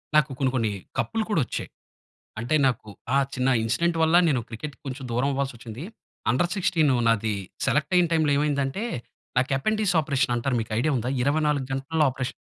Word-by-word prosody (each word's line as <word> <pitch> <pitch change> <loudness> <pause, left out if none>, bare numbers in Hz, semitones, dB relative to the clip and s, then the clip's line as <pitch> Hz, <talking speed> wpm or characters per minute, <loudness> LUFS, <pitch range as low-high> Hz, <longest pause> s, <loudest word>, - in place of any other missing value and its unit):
నాకు 150 -1 +5
కొన్ని 135 -2 +2
కొన్ని 115 -4 +1 0.3
కప్‌లు 225 -1 0
కూడా 175 -8 +2
వచ్చాయి. - - -5 0.7
అంటే 120 +7 0
నాకు 120 -4 -2 0.3
ఆ! - - +5 0.2
చిన్న 130 +1 +1
ఇన్సిడెంట్ 165 +9 +1
వల్ల, 160 +1 +4
నేను 135 -6 +2
క్రికెట్‌కి 125 +4 -7
కొంచెం 135 0 -5
దూరం 125 +4 +1
అవ్వాల్సి 135 0 -1
వచ్చింది. 115 +4 -8 0.5
అన్డర్ 170 +7 +2
16 165 -6 +2 0.2
నాది 110 -2 +2 0.3
సెలెక్ట్ 150 0 +1
అయ్యే 180 -1 +6
టైమ్‌లో 155 -3 +3
ఏమైందంటే, 145 +4 0 0.5
నాకు 130 +1 +2
యపండీస్ 210 +6 +1
ఆపరేషన్ 140 -4 +1
అంటారు 125 +2 0
మీకు 110 - -7
ఐడియా 155 +6 +2
ఉందా? 120 +1 -2
24 150 0 +1
గంటల్లో 150 +4 +1
ఆపరేషన్. 130 0 -5
140 Hz, 170 wpm, -25 LUFS, 125-155 Hz, 0.7 s, అయ్యే